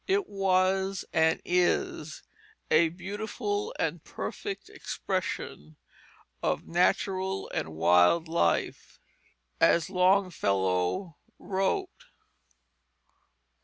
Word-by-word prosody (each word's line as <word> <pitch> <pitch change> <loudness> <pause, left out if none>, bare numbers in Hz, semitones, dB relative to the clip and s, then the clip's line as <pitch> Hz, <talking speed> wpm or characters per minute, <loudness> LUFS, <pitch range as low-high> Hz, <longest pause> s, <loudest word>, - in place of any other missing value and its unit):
It 390 0 +1
was 190 0 +1
and 160 0 +3
is 175 -3 0 0.5
a 160 +1 +5
beautiful 220 - -4
and - - -2
perfect 405 -2 -6
expression 80 - -4 0.6
of - - -1
natural 190 +2 0
and 80 0 -3
wild 90 - +4
life; 160 - -1 0.6
as 170 +2 +3
Longfellow 170 - +1 0.2
wrote 190 0 -2
180 Hz, 75 wpm, -28 LUFS, 155-195 Hz, 0.6 s, a